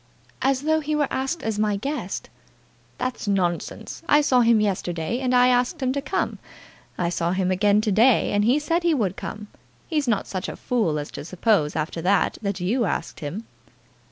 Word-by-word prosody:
"As 265 +1 +1
though 315 +1 +2
he 305 0 -2
were 300 -1 +2
asked 270 +6 -2
as 220 -2 -2
my 210 -1 +1
guest." 275 +9 -4 0.7
"That's 255 -3 -3
nonsense. 180 -4 -2
I 295 - +6
saw 255 -4 +3
him 230 -1 +5
yesterday, 185 0 -1
and 255 -1 -1
I 250 0 +6
asked 250 +6 +1
him 260 -2 0
to 280 - -2
come. - - -2 0.6
I 175 -1 0
saw 170 0 -1
him 185 -1 0
again 205 +2 +3
to 215 -1 0
day, 225 +5 +4
and 205 0 +2
he 245 +6 +4
said 330 +4 0
he 340 -2 +2
would 200 -8 0
come. 210 -1 -6 0.4
He's 300 -5 -1
not 215 -4 +1
such 185 -2 -4
a - - -6
fool 215 -11 0
as 145 0 -5
to - - -7
suppose 180 -2 +1
after 160 +1 -2
that, 195 +4 +1
that 200 -2 -2
you 225 +7 +1
asked 170 - -3
him." 175 +10 -5
220 Hz, 195 wpm, -24 LUFS, 185-260 Hz, 0.7 s, I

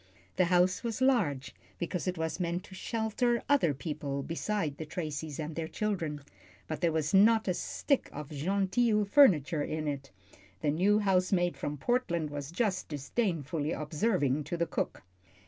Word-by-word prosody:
The 185 - +4
house 180 +3 +3
was 230 -2 -2
large, 205 - +1 0.2
because 175 +1 -3
it 180 -1 -1
was 160 +2 -2
meant 175 0 -1
to - - -13
shelter 230 +4 0
other 280 - +4
people 140 -1 -4
beside 165 -2 -2
the 160 - -5
Tracys 155 -2 -4
and 155 0 -4
their 165 -1 -3
children, 165 -8 -2 0.5
but 155 -2 -4
there 170 - +3
was 155 +1 -1
not 220 +3 +5
a 185 - +2
stick 275 - -1
of 150 0 -7
"genteel" 200 - +1
furniture 180 - +5
in 155 +1 -3
it, 140 -1 -4 0.5
the 145 - +2
new 190 +7 +3
housemaid 185 -3 +2
from 145 0 -4
Portland 170 - 0
was 145 -1 -5
just 190 0 -1
disdainfully 155 - -2
observing 150 - 0
to 175 - -3
the 170 - +1
cook. - - -3
170 Hz, 160 wpm, -30 LUFS, 150-205 Hz, 0.5 s, not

